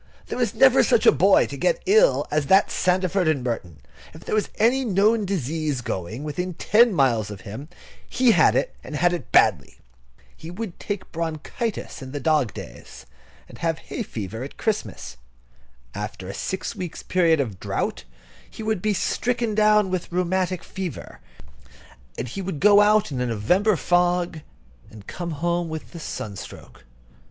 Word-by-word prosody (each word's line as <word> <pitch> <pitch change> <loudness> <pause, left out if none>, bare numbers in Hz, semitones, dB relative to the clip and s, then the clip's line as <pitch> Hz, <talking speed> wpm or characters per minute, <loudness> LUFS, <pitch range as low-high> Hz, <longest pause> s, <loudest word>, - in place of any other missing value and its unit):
There - - -4 0.2
never - - +6
was - - +4
such 475 - +3
a - - +9
boy - - +4
to - - -7
get - - 0
ill 440 +6 +4
as 150 -2 0
that 195 +1 +4
Sandford 185 0 +1
and 150 -5 +1
Merton. 95 - -4 0.4
If 160 - -13
there - - -4
was 215 -1 +1
any 245 +5 +2
known 210 0 +2
disease 155 -6 -2
going 110 +5 -5
within 175 +4 -4
ten 230 +7 +4
miles 120 - +1
of 100 -2 -8
him, 110 +11 -8 0.4
he 255 -2 +3
had - - +4
it, - - 0
and - - -7
had 175 0 +2
it 170 -9 -5
badly. - - +3 0.6
He 160 - -10
would 190 +1 -7
take 205 -2 -5
bronchitis 165 +7 -4
in 130 0 -9
the 145 - -3
dog 145 -5 +1
days, - - -10 0.4
and - - -14
have 165 -1 -1
hay - - -7
fever 110 - -6
at 140 - -9
Christmas. 200 - -3 0.8
After 105 -2 -6
a 95 - -6
six 190 - -4
weeks' 175 -3 -6
period 170 -4 +2
of 110 -9 -3
drought, - - -3 0.5
he 220 - -9
would 215 -4 -1
be 215 0 0
stricken 235 +2 -1
down 210 -2 +3
with 185 -2 -3
rheumatic 180 0 -1
fever; 190 -4 -7 1.0
and 125 - -4
he 160 +11 -5
would 185 -5 -4
go 205 +2 +6
out 210 -2 +3
in 130 -2 -3
a 125 - 0
November 180 - +2
fog 175 +1 +1 0.5
and 105 -2 -13
come 175 +8 -6
home 170 +2 -1
with 160 +2 -7
a 170 - -8
sunstroke. 100 - -8
175 Hz, 170 wpm, -23 LUFS, 135-205 Hz, 1.0 s, a